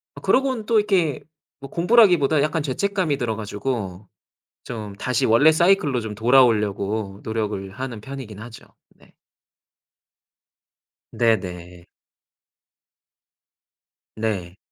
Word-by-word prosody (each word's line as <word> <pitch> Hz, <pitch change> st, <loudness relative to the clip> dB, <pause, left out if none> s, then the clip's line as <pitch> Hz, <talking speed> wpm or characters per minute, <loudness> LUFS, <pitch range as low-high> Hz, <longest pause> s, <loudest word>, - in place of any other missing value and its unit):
아 -, -, -10 dB
그러고는 260 Hz, -4 st, +1 dB
또 225 Hz, -1 st, +3 dB
이렇게 185 Hz, -9 st, +1 dB, 0.4 s
뭐 135 Hz, 0 st, -10 dB
공부라기보다 175 Hz, -, +4 dB
약간 155 Hz, +1 st, 0 dB
죄책감이 175 Hz, +2 st, -1 dB
들어 115 Hz, -4 st, -2 dB
가지고 105 Hz, -3 st, -5 dB, 0.6 s
좀 105 Hz, -4 st, -7 dB
다시 125 Hz, +3 st, -1 dB
원래 130 Hz, +8 st, +5 dB
사이클로 160 Hz, -6 st, +2 dB
좀 110 Hz, -2 st, -6 dB
돌아오려고 105 Hz, -4 st, +2 dB
노력을 105 Hz, -3 st, -3 dB
하는 120 Hz, 0 st, -6 dB
편이긴 125 Hz, -5 st, -9 dB
하죠. 115 Hz, 0 st, -11 dB, 0.3 s
네. -, -, -24 dB, 2.0 s
네 115 Hz, -1 st, +3 dB
네. 90 Hz, -1 st, -9 dB, 2.3 s
네. 100 Hz, -5 st, -3 dB
120 Hz, 230 characters per minute, -22 LUFS, 105-155 Hz, 2.3 s, 원래